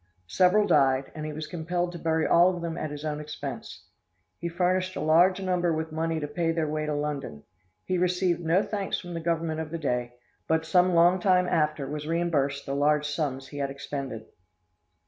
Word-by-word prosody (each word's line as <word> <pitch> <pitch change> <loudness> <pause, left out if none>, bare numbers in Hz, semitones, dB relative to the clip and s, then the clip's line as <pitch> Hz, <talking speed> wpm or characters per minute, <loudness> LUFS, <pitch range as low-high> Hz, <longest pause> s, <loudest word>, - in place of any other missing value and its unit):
Several 180 - +3
died, 135 -7 +3
and 155 0 -5
he - - -4
was 155 +1 -5
compelled 175 +1 -2
to 175 - -8
bury 160 -1 +1
all 180 +2 +5
of 175 - -6
them 165 -1 -3
at 155 - -3
his 150 +1 -7
own 150 -1 -2
expense; 150 0 -7 0.5
he 170 - -3
furnished 185 +2 0
a - - -3
large 175 +5 +4
number 180 -2 0
with 160 0 -2
money 160 +1 -1
to 150 - -3
pay 165 +3 -1
their 165 -1 -1
way 155 0 -2
to 150 - -1
London. 145 - -4 0.4
He 185 -1 0
received 180 -1 +1
no 170 +4 +2
thanks 200 -2 -2
from 175 -1 -8
the 165 - -3
Government 165 -1 -1
of 160 -1 -4
the 165 - -4
day, 125 -5 -2 0.3
but 160 0 +1
some 180 +1 +3
long 175 +2 +5
time 180 -1 +3
after 150 -4 0
was 150 +1 -5
reimbursed 155 -5 0
the 135 - -3
large 150 +1 +2
sums 140 -3 -3
he 145 - -7
had 140 -1 -1
expended." 135 -4 -6
160 Hz, 205 wpm, -27 LUFS, 150-175 Hz, 0.5 s, all